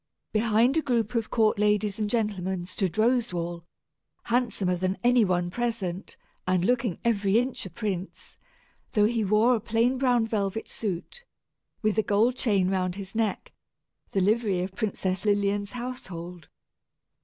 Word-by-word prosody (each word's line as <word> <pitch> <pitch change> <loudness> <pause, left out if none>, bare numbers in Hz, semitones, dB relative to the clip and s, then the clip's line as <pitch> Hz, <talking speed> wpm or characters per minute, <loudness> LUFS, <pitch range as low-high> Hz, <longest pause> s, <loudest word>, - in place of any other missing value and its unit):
Behind 225 +4 +3
a - - +3
group 235 -6 0
of 230 -2 -1
court 220 -3 +2
ladies 210 0 +1
and 210 -1 0
gentlemen 190 -5 -1
stood 185 0 -3
Roswal, 180 -8 0 0.6
handsomer 230 -6 0
than 185 +2 -1
any 245 -1 +5
one 175 -2 0
present, 210 -5 -3 0.3
and 185 -1 +2
looking 235 -5 +1
every 205 -3 +2
inch 245 -4 -1
a - - -10
prince, 190 -1 -5 0.6
though 210 -4 +4
he 225 0 +1
wore 215 +5 +4
a 235 - +1
plain 230 +4 +1
brown 245 -3 +3
velvet 215 -1 -2
suit, 210 - -5 0.6
with 215 0 +2
a - - +5
gold 220 +4 +2
chain 200 -7 +2
round 185 -1 0
his 195 -1 -7
neck, 220 -3 -2 0.6
the 195 - 0
livery 205 -2 +2
of 185 +1 -5
Princess 190 -2 -2
Lilian's 205 0 +1
household. 180 - -7
210 Hz, 145 wpm, -27 LUFS, 185-235 Hz, 0.6 s, any